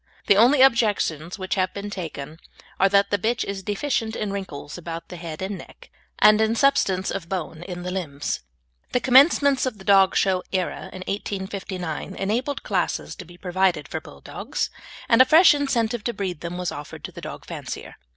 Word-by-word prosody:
The 200 - +5
only 255 +6 +6
objections 205 - +2
which 185 -1 -3
have 185 -1 0
been 205 +1 -5
taken 160 -5 -6 0.4
are 195 - +5
that 200 0 +3
the 205 - +2
bitch 230 +4 0
is 195 -1 -4
deficient 220 +2 -1
in 205 -2 -3
wrinkles 150 -7 -6
about 165 -1 -7
the 180 - -7
head 165 0 -6
and 195 0 -4
neck, - - -14 0.3
and 215 +1 +6
in 220 +1 +2
substance 195 -8 +2
of 170 -4 -5
bone 165 -4 -4
in 175 0 -7
the 180 - -3
limbs. 145 -7 -3 0.5
The - - +3
commencement 275 +1 +5
of 235 -5 -4
the 190 - -13
dog 195 -2 +5
show 185 -2 +2
era 185 -2 -2
in 185 - -7
1859 190 -3 -4
enabled 245 +8 -2
classes - - -1
to 185 - -8
be 175 +1 -15
provided 185 0 0
for - - -4
Bulldogs, - - -5 0.4
and 230 +1 +6
a - - +11
fresh 320 +6 +7
incentive 240 -6 0
to 235 - 0
breed 185 -7 -4
them 175 +1 -5
was 180 -1 -2
offered 145 0 -8
to - - -6
the - - -10
dog - - -8
fancier. - - -7
195 Hz, 190 wpm, -24 LUFS, 180-225 Hz, 0.5 s, a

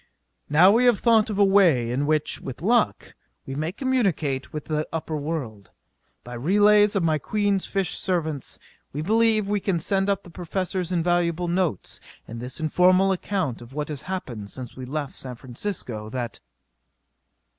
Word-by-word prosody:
Now 170 +6 +6
we 235 +4 +4
have 240 -4 +5
thought 225 -1 +3
of 210 - -3
a 205 - +5
way 170 -12 +4
in 140 +4 -1
which, 155 -1 0
with 135 +3 -8
luck, 235 +2 +1 0.3
we 135 - -6
may 155 +4 -2
communicate 190 - -1
with 150 -1 -6
the 155 -1 -2
upper 160 -1 -3
world. 140 - -4 0.5
By 120 - -9
relays 205 - +4
of 195 - +1
my 155 -2 +2
Queen's 205 +3 0
fish 195 -3 -1
servants 160 -7 -2 0.4
we 150 +2 -3
believe 220 +1 +2
we 205 0 0
can 190 -2 0
send 195 +4 0
up 200 0 0
the 175 - -13
Professor's 180 +1 -3
invaluable 175 0 +1
notes[A] 175 - -1 0.3
and 115 +1 -7
this 125 +5 -5
informal 185 +4 +4
account 185 - -2
of 120 +2 -12
what 150 +1 -3
has 150 -3 -5
happened 120 - -5
since 125 0 -8
we 130 - -7
left 145 +1 -4
San 130 -2 -8
Francisco 120 - -5
that.... 120 -1 -4
170 Hz, 165 wpm, -24 LUFS, 135-195 Hz, 0.5 s, Now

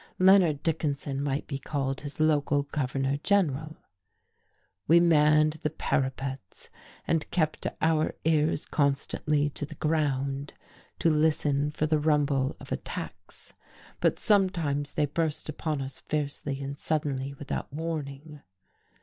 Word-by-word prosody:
Leonard 185 -6 +5
Dickinson 145 -4 -1
might 140 0 -1
be 140 -2 -4
called 135 -1 -2
his 145 +1 -7
local 145 -2 +2
governor 135 -1 -1
general. 155 -4 +1 1.1
We 170 +3 +7
manned 155 -2 +4
the 150 - 0
parapets 130 - -3 0.4
and 165 -2 0
kept 155 -3 0 0.2
our 160 -1 +2
ears 155 -1 +2
constantly 145 +1 0
to 145 - -5
the 155 +1 -6
ground 140 -2 -1 0.4
to 165 - +3
listen 150 -2 +2
for 150 +1 -1
the 155 0 +2
rumble 145 -3 +1
of - - -12
attacks; - - -7 0.5
but - - +2
sometimes 170 -9 +1
they 150 - +2
burst 155 +1 -2
upon 150 -2 -2
us 135 0 -8
fiercely 145 -2 -3
and 140 +1 -5
suddenly, 140 -3 -1
without 140 0 -5
warning. 150 -1 -5
150 Hz, 125 wpm, -28 LUFS, 140-155 Hz, 1.1 s, We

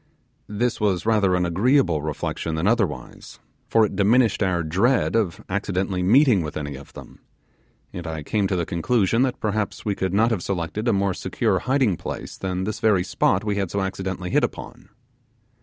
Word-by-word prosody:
This 115 +3 -1
was 100 -4 +1
rather 105 -5 +3
an 90 0 +1
agreeable 90 - +2
reflection 80 +1 -3
than 80 +2 -1
otherwise, 105 -8 -2 0.3
for 115 -1 +4
it 100 - -5
diminished 110 +3 +3
our 90 -3 +1
dread 100 +12 +1
of 105 -7 0
accidentally 95 -1 -2
meeting 115 +2 +4
with 75 -2 -5
any 75 -2 -5
of 70 +1 -12
them, - - -12 0.7
and 90 -1 -6
I 80 -2 -5
came 100 +4 0
to 95 - -1
the 85 -2 -1
conclusion 100 +6 +1
that 130 -2 0
perhaps 105 -1 -2
we 105 - +1
could 95 -1 -2
not 110 +5 +3
have 105 -6 -1
selected 100 +5 -3
a - - +4
more 100 -1 +1
secure - - -1
hiding 130 - +1
place - - -6
than 95 -1 -3
this 105 +2 -3
very 105 -5 +3
spot 95 +2 +1
we 105 -1 -1
had 95 -3 -1
so 100 - -2
accidentally 95 -1 -4
hit - - +3
upon. - - -5
95 Hz, 185 wpm, -23 LUFS, 90-110 Hz, 0.7 s, for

